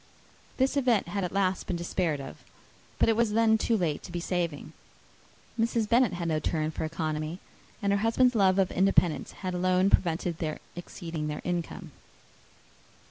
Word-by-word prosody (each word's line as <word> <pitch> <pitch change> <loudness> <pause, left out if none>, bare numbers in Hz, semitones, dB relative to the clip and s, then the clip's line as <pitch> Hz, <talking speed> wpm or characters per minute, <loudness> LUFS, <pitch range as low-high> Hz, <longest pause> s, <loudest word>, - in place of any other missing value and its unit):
This 265 +1 +2
event 245 -9 +2
had 200 +2 -2
at 180 - -2
last 190 -2 0
been 180 - -1
despaired 170 -3 -1
of, 135 - -8 0.6
but - - +3
it 225 - +3
was 225 -2 +1
then 225 0 +4
too 225 +1 +1
late 165 -6 -1
to 180 - -10
be 175 - -3
saving. 170 -4 -3 0.9
Mrs. 225 -1 +1
Bennet 240 0 +3
had 175 -1 -3
no 155 -2 +1
turn 155 0 -1
for 160 - -3
economy; 155 0 -3 0.5
and 200 0 +2
her 200 - +2
husband's 240 +4 +3
love 195 -4 +3
of 195 -2 +2
independence 185 -3 +2
had 185 - -1
alone 185 +2 +2
prevented 170 -1 +1
their 155 -2 -2 0.2
exceeding 165 -3 -5
their 150 0 -4
income. 175 -2 -4
180 Hz, 170 wpm, -28 LUFS, 165-210 Hz, 0.9 s, then